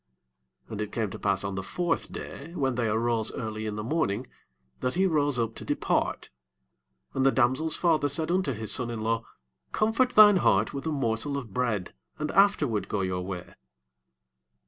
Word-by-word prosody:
5 - - -19
And 105 -1 -4
it 105 -1 -4
came 110 -4 -2
to - - -7
pass 100 -1 0
on 100 0 -3
the 95 - -3
fourth 170 - -2
day, 165 +5 -8
when 135 -4 0
they 120 -1 0
arose 110 +1 +1
early 110 0 -4
in 105 - -3
the 105 - -4
morning, 120 -4 -1 0.5
that 125 +3 -1
he 190 +2 +3
rose 145 -6 +2
up 115 -1 -1
to - - -8
depart: - - -1 0.8
and 135 - 0
the 135 - +5
damsel's 135 +6 +2
father 155 -4 +2
said 155 +4 -1
unto 180 -6 +1
his 110 -2 -4
son 125 -2 +1
in 115 -2 -4
law, 115 +1 0 0.5
Comfort 230 +4 +2
thine 210 -2 +9
heart 110 - +2
with 140 +3 -4
a - - 0
morsel 135 0 -1
of 120 -8 -7
bread, 110 -7 -1 0.2
and 150 0 -3
afterward 150 - +3
go 105 - -1
your 90 -1 -1
way. 90 -1 -6
120 Hz, 190 wpm, -27 LUFS, 110-155 Hz, 0.8 s, thine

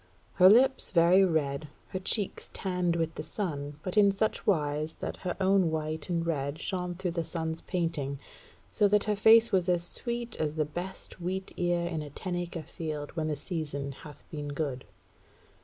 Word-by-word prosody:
Her 185 0 +8
lips 260 +5 +5
very 175 +2 +6
red; 155 -4 0 0.2
her 185 - -3
cheeks 195 +1 -1
tanned 180 -3 0
with 165 -1 -1
the - - -5
sun, 150 -5 -4
but 185 +2 -4
in 200 -1 +7
such 205 +2 -1
wise 155 -4 +1
that - - -5
her 180 -2 -4
own 190 -2 +4
white 155 +1 -3
and 170 -1 0
red 140 -3 -1
shone 180 +1 -3
through 180 0 -2
the 170 -1 -1
sun's 160 0 -4
painting, 165 -6 -2 0.6
so 210 - +4
that 210 0 +3
her 210 0 0
face 225 +2 +6
was 185 -2 +2
as 175 -1 +2
sweet 235 +5 -3
as 155 -1 -1
the 155 -1 +1
best 180 +4 -6
wheat 190 +2 -3
ear 175 -1 +1
in 165 -3 -2
a 150 - -7
ten 175 +5 -4
acre 175 -2 -4
field 155 -4 -5
when 160 -2 -1
the 155 - 0
season 145 -3 -4
hath 145 +1 -12
been 150 -2 -4
good. 145 -3 -3
170 Hz, 185 wpm, -29 LUFS, 155-190 Hz, 0.6 s, Her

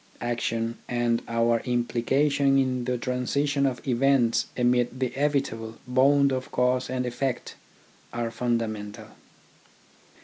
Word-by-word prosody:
Action 115 -1 -2
and 120 -1 +1
our 115 0 +2
implication 135 +4 +1
in 130 -2 0
the 125 0 -1
transition 140 +3 0
of 130 0 -4
events 125 -1 +2
amid 125 0 +1
the 130 -2 0
evitable 135 -6 -1
bond 140 +2 +4
of 130 0 -3
cause 125 +1 +1
to 125 0 -2
effect 125 +1 -3 0.6
are 120 -1 -3
fundamental. 115 -3 -3
125 Hz, 110 wpm, -26 LUFS, 115-135 Hz, 0.6 s, bond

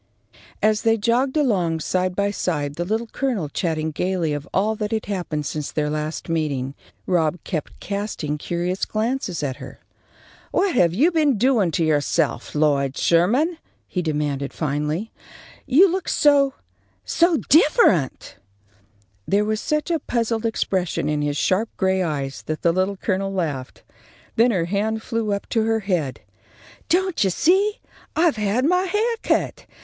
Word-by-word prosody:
As 215 0 +3
they 225 0 +3
jogged 245 +6 +1
along, 185 - +1
side 185 +2 0
by 200 +1 +1
side, 150 -8 -2
the 175 +3 -3
Little 220 +5 -1
Colonel 225 - -2
chatting 160 -1 -1
gaily 175 -1 -1
of 145 0 -5
all 210 +3 +1
that 210 -1 -2
had 220 -1 -1
happened 175 -7 -3
since 150 +1 -4
their 150 -1 -1
last 155 +1 -3
meeting, 145 -5 -1 0.3
Rob 170 -2 +1
kept 155 -6 -5
casting 200 -7 -3
curious 175 +4 -2
glances 215 - -2
at 130 -2 -2
her. - - -10 0.7
"What 385 -1 +1
have 175 -7 +3
you 305 - +4
been 300 -7 +2
doing 230 -5 +3
to 165 - +1
yourself, 145 -4 0
Lloyd 140 -3 +1
Sherman?" 250 - +2 0.3
he 180 - -2
demanded, 145 -4 -2
finally. 150 +7 -2 0.6
"You 330 +10 +6
look 370 0 -2
so 280 -2 +4 0.5
so 340 -1 +3
different!" 290 - +3 0.9
There 205 +1 +2
was 215 0 -1
such 300 +3 -1
a 330 - +1
puzzled 230 -3 -1
expression 185 -8 -1
in 150 -1 0
his 145 0 -1
sharp 205 +8 +1
gray 190 -1 +1
eyes 140 -5 -3
that 155 0 -4
the 170 - +4
Little 190 +2 0
Colonel 195 0 -1
laughed. 150 -9 -4 0.5
Then 235 +2 +5
her 185 -7 +1
hand 215 +4 -1
flew 225 -3 -2
up 200 0 -2
to 225 -2 +1
her 225 0 +1
head. 175 -9 -2 0.7
"Don't 370 - +2
you 195 - +2
see? 385 - +2 0.4
I've 320 -6 +3
had 215 +5 +1
my 360 +4 +3
hair 435 +5 0
cut. - - -1
195 Hz, 155 wpm, -22 LUFS, 155-235 Hz, 0.9 s, You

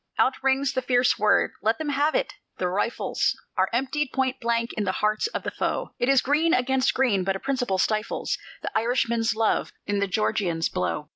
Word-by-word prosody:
Out 260 - +3
rings 270 +1 +1
the 260 - 0
fierce 245 0 +2
word, 210 0 +3
"Let 220 +1 +1
them 315 -2 -3
have 290 +2 +1
it!" - - 0 0.2
the 180 - -1
rifles 205 +6 -1 0.2
Are - - +2
emptied 270 +3 -1
point 265 -1 -1
blank 235 0 0
in 215 - -2
the 185 -2 -1
hearts 215 - +1
of 450 - -5
the - - -3
foe: - - -2
It 245 - +1
is 275 -1 +4
green 310 +5 +3
against 260 +1 +1
green, 235 -8 +2
but 190 +1 0
a - - -4
principle 250 -7 -1
stifles 215 +3 -1 0.2
The - - -3
Irishman's 230 -1 +1
love 225 0 +1
in 205 0 -1
the 200 - +1
Georgian's 190 -5 0
blow. 170 -4 -2
240 Hz, 200 wpm, -25 LUFS, 210-265 Hz, 0.2 s, is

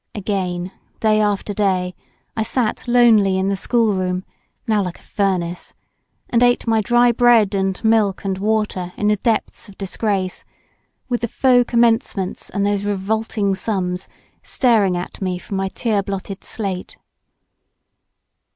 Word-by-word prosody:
Again, 185 -3 -2 0.3
day 215 -1 +3
after 205 0 0
day, 185 -3 0 0.4
1 220 - -1
sat 230 0 -1
lonely 225 -6 +5
in 190 +1 0
the 200 - +1
schoolroom—now 200 0 -1
like 180 -2 -5
a - - -18
furnace—and 190 +4 -3
ate 245 0 +3
my 225 -1 +2
dry 240 +3 +4
bread 235 -4 +4
and 190 -1 -1
milk 220 -4 +2
and 190 -1 -2
water 205 -4 -1
in 210 - +1
the 210 - +2
depths 225 0 -2
of 195 - -15
disgrace, 195 -1 -2 0.6
with 240 -2 -1
the 235 - 0
faux 245 +1 +3
commencements 225 -5 +1
and 200 0 -1
those 205 -1 0
revolting 205 0 -1
sums 185 -2 -2 0.3
staring 215 -8 +2
at 175 - -7
me 185 -2 -1
from 195 +2 -6
my 195 0 -1
tear 215 -1 0
blotted 195 0 -6
slate. 195 -4 -5
205 Hz, 135 wpm, -20 LUFS, 190-225 Hz, 0.6 s, lonely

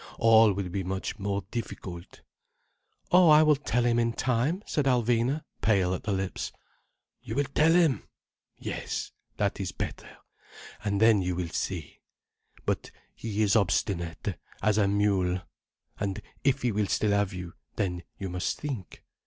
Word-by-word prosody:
All 115 -1 +6
will 95 -1 -3
be 95 +2 -2
much 95 +3 -4
more 100 0 -1
difficult—" 95 -7 -6 0.9
"Oh, 180 -2 +7
I 155 0 +8
will 155 -1 +5
tell 125 -4 0
him 120 -1 +3
in 115 0 +1
time," 130 - 0
said 150 - 0
Alvina, 125 +3 +2 0.2
pale 95 -4 +3
at 95 - -3
the 105 - 0
lips. 95 -1 -2 0.7
"You 110 - -6
will 145 - +3
tell 160 +2 +5
him! 165 -6 +3 0.5
Yes. - - -4 0.3
That - - 0
is - - -2
better. - - -5 0.7
And 100 -1 0
then 110 -2 +5
you 90 -1 -1
will 90 -1 -3
see. 85 -2 -4 0.7
But - - -1 0.2
he 110 -1 -2
is 105 +1 +3
obstinate—as 100 +1 0
a 100 - +4
mule. 100 -3 +2 0.6
And 100 -1 -2 0.2
if 135 -1 +2
he 120 - +2
will 105 -1 0
still 105 +1 +1
have 100 -1 +2
you, 90 -2 -7 0.2
then 90 -3 -1 0.2
you 95 - -4
must 90 0 -2
think. 130 -11 -6
105 Hz, 155 wpm, -28 LUFS, 95-120 Hz, 0.9 s, I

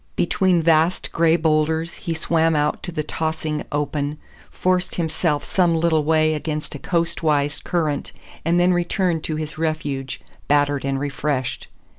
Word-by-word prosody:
Between 175 -1 +2
vast 165 +2 +2
gray 165 0 +3
boulders 160 0 +1
he 170 -3 -4
swam 160 0 +2
out 150 0 0
to 175 - -5
the 155 -2 -2
tossing 155 0 -2
open, 145 0 -2 0.3
forced 185 0 0
himself 160 -2 0
some 175 -3 +2
little 160 -1 +2
way 155 0 +3
against 155 0 -3
a 145 - -7
coast 170 +1 0
wise 145 -2 +1
current, 155 -5 -1 0.3
and 170 +2 +2
then 180 +1 +4
returned 175 -1 0
to 155 - -2
his 155 0 -5
refuge 145 -5 -2 0.3
battered 145 -1 +2
and 135 -1 -1
refreshed. 140 -2 -2
155 Hz, 150 wpm, -22 LUFS, 150-170 Hz, 0.3 s, then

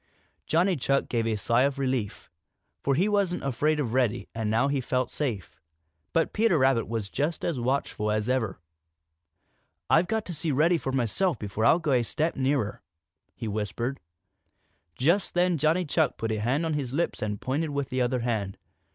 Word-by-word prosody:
Johnny 180 +4 +3
Chuck 140 -1 0
gave 115 -2 0
a 110 - +1
sigh 115 +4 +2
of 140 +1 +1
relief, 130 -6 -2 0.5
for 140 - +1
he 180 +8 +2
wasn't 200 -4 0
afraid 145 +4 +1
of 120 -6 -1
Reddy 125 -3 +1
and 110 -2 -2
now 115 +5 +2
he 140 -1 0
felt 125 0 -1
safe. 120 - -4 0.5
But 165 - +1
Peter 220 -5 +3
Rabbit 130 -4 +3
was 115 -3 -3
just 150 - -2
as 160 -7 -1
watchful 120 -4 -1
as 105 +1 0
ever. 115 -8 -1 1.3
"I've 165 +3 +5
got 220 -1 -1
to 180 - -5
see 160 +1 -2
Reddy 165 +5 +3
for 135 - -3
myself 135 - +1
before 105 +1 -2
I'll - - +6
go 155 -4 -1
a 125 -2 +4
step 155 +8 -1
nearer," 130 -5 0 0.5
he 115 - -5
whispered. 110 +5 -3 1.0
Just 170 +10 +1
then 175 -2 +2
Johnny 160 +5 +2
Chuck 155 0 +1
put 115 0 -2
a 110 - -1
hand 130 +9 0
on 160 - -1
his 135 -4 -3
lips 170 +4 -1
and 105 -1 -2
pointed 150 +5 -1
with 140 -2 -2
the 130 0 -1
other 125 0 0
hand. 110 -5 -2
135 Hz, 185 wpm, -27 LUFS, 115-160 Hz, 1.3 s, I'll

